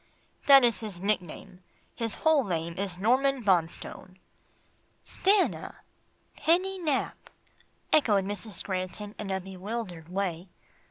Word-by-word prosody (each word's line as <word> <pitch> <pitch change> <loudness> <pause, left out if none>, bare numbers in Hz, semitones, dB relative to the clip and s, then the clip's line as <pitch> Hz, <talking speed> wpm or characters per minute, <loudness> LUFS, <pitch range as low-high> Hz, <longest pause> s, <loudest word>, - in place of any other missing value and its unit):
"That 275 -2 +9
is 235 -2 +3
his 210 -6 -5
nickname, 185 -2 -2 0.3
his 230 -3 -3
whole 315 -3 +3
name 170 -4 -3
is 190 -2 -3
Norman 260 +5 +2
Bonstone." 185 0 -1 0.9
"Stanna 395 0 +1 0.5
Penny 370 +4 +1
Nap," 300 -6 -2 0.6
echoed 210 -10 +4
Mrs. 205 -1 -2
Granton 190 +2 -4
in 210 - -5
a 190 0 -1
bewildered 190 -2 -6
way. 180 -2 -3
200 Hz, 110 wpm, -28 LUFS, 185-255 Hz, 0.9 s, That